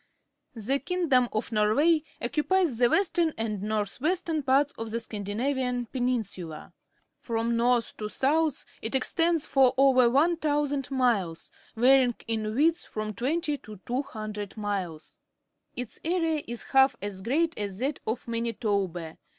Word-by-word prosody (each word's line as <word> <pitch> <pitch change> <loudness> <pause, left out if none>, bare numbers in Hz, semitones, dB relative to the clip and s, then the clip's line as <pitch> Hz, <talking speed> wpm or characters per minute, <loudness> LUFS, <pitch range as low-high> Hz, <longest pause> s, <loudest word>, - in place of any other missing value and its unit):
— - - -53
The 245 +5 0
king 360 -1 -2
dom 250 -2 +4
of 215 +2 -3
Norway 270 +10 +3 0.2
occupies 300 +2 +1
the 240 -1 +5
western 340 -3 +2
and 215 -3 -2
north 210 +1 -2
western 330 -1 0
parts 275 +2 +2
of 225 0 -5
the 230 +1 -2
Scandinarian 245 +4 -2
Peninsula. 220 - -3 0.5
From 230 0 -1
north 240 0 +1
to 210 -1 -4
south 295 +4 +1 0.2
it 225 +4 -3
extends 330 +4 +1
for 265 -3 +4
over 260 -3 +5
1,000 290 -1 +1
miles, 230 -11 0 0.2
varying 250 +1 +5
in 220 -1 -2
width 325 +5 +2
from 215 0 -4
twenty 290 - -1
to 215 -3 -11
200 215 -5 -4
miles. 190 -7 -4 0.6
Its 250 -2 -5
area 330 -2 0
is 235 -1 -5
about - - -15
half 265 -1 +5
as 200 -2 -4
great 310 - +1
as 200 -2 -4
that 275 +5 -2
of 230 +3 -3
Manitoba. 205 -8 -2
245 Hz, 140 wpm, -27 LUFS, 215-290 Hz, 0.6 s, the